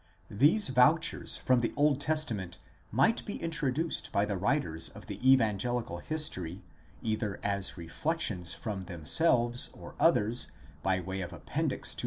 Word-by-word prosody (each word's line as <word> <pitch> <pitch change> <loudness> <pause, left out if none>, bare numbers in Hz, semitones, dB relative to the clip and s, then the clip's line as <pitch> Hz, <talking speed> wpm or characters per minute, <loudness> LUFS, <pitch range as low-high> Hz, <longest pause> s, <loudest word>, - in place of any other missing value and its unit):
These 145 - +4
vouchers 140 +6 +3
from 130 -1 +2
the 115 - -1
Old 145 -1 +3
Testament 115 - -1 0.3
might 135 - +3
be 205 - -5
introduced 160 -1 -2
by 100 - +2
the 105 - -2
writers 95 - 0
of - - -13
the 130 +1 +2
evangelical 115 -5 +1
history 95 - -3 0.4
either 110 -2 -2
as 100 -1 -1
reflections 90 - -1
from 100 -4 -5
themselves 120 - +2
or - - -11
others 110 +4 +3 0.3
by 95 -1 +1
way 95 +2 -4
of 90 -1 -5
appendix 80 - -1
to - - -5
115 Hz, 140 wpm, -30 LUFS, 95-145 Hz, 0.4 s, These